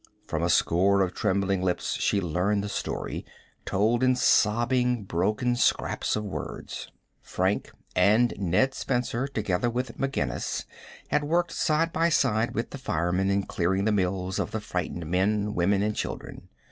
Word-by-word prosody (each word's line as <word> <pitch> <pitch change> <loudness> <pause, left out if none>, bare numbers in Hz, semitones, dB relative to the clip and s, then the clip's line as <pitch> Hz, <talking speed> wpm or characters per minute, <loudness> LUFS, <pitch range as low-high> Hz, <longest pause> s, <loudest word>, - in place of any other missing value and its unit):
From - - -2
a - - +1
score 95 +3 +3
of 90 - -2
trembling 100 -2 0
lips 90 -1 -1
she 100 - +1
learned 95 +4 0
the 105 - -4
story, - - -4 0.4
told 110 +5 +1
in 130 0 +4
sobbing, 120 0 +2
broken 105 +7 0
scraps 120 - +1
of 105 - -2
words. 100 - -6 0.3
Frank 95 +2 -1 0.3
and 110 +6 +4
Ned 100 +9 +2
Spencer, 125 0 -1
together 110 -4 -1
with 125 +2 -4
McGinnis, 70 - -2 0.4
had 150 - +1
worked 170 +3 +1
side 165 +2 +1
by 165 +1 +2
side 120 -7 +1
with 115 - -2
the 140 - -7
firemen 90 -4 0
in 100 0 +1
clearing 95 +2 0
the 110 - +3
mills 95 -2 -1
of - - -1
the 110 - -3
frightened 90 -4 -4
men, 100 +5 +1
women, 100 +3 +2
and 105 0 -1
children. - - -6
105 Hz, 155 wpm, -27 LUFS, 95-120 Hz, 0.4 s, in